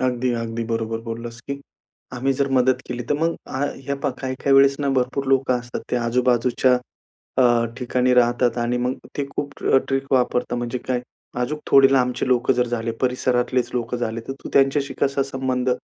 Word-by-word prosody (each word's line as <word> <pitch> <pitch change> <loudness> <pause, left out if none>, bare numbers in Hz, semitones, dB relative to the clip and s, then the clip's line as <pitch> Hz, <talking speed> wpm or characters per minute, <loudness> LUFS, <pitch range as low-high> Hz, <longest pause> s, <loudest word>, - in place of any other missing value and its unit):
अगदी, 125 -1 0
अगदी 115 0 -3
बरोबर 115 0 -2
बोललास, 115 0 -7
की 140 +2 -6 0.5
आम्ही 135 +2 0
जर 140 +1 0
मदत 130 0 +3
केली 125 0 -4
तर - - +4
मग, 165 +1 +1 0.5
ह्या 140 - -1
पाहा 130 - -1
काही-काही 130 +1 0
वेळेस 140 0 +6
ना, 140 - 0
भरपूर 130 +2 -1
लोकं 130 -2 +2
असतात 120 0 -6
ते 125 - +1
आजूबाजूच्या 125 +1 +2 0.6
अ, - - +6 0.3
ठिकाणी 125 0 +1
राहतात 120 0 +3
आणि 120 +1 0
मग 125 +1 0 0.2
ते 140 - -1
खूप 140 0 -4 0.4
ट्रिक 135 0 -1
वापरतात 125 -1 +1
म्हणजे 120 +1 -3
काय 125 0 -2 0.4
अजूक 150 +5 -3
थोडे 135 0 +6
लांबचे 125 -1 +1
लोकं 125 +1 +3
जर 125 0 +1
झाले, 115 -1 -2
परिसरातलेच 125 0 +1
लोकं 120 0 -2
झाले, 115 -1 -3
तर 135 - -1
तू - - -5
त्यांच्याशी 140 +1 +3
कसा 140 0 +2
संबंध 130 -2 -1
125 Hz, 175 wpm, -22 LUFS, 120-135 Hz, 0.6 s, वेळेस